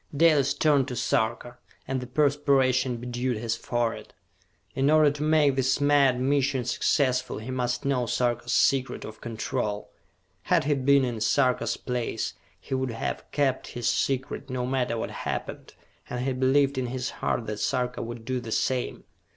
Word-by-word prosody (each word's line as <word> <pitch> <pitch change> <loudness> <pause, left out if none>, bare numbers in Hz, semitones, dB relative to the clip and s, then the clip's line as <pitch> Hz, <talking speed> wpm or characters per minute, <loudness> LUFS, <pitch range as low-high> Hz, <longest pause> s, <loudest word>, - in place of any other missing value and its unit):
Dalis 150 -4 +4
turned 145 -4 +3
to 125 - -4
Sarka, 120 +1 -1 0.3
and 130 -1 -2
the 125 - -7
perspiration 135 -2 +2
bedewed 120 0 -2
his 115 +1 -2
forehead. 120 -1 -3 0.6
In 135 +1 +1
order 155 -1 +5
to 145 +1 -7
make 150 -3 +3
this 130 0 +1
mad 140 -3 +4
mission 135 -1 +1
successful, 130 +1 +1
he 110 +4 -6
must 125 -1 -2
know 130 -3 +1
Sarka's 120 0 0
secret 135 -1 +2
of 110 0 -10
control. 110 -2 -3 0.5
Had - - +3
he 145 +2 +2
been 140 0 +3
in 120 -3 -4
Sarka's 125 -1 +2
place, 125 -2 -3 0.3
he - - -7
would 130 0 0
have 115 -1 -3
kept 135 -3 0
his 120 - -1
secret, 135 +1 -1
no 130 -1 -2
matter 125 -2 -1
what - - -3
happened, - - -5 0.3
and 125 +1 -3
he 135 - 0
believed 135 +1 +2
in 125 - -2
his 125 +1 -3
heart 115 - 0
that 105 -1 -4
Sarka 125 +2 -1
would 115 0 -7
do 130 +1 -1
the 115 -2 -7
same. 125 +2 -1
130 Hz, 165 wpm, -26 LUFS, 120-140 Hz, 0.6 s, order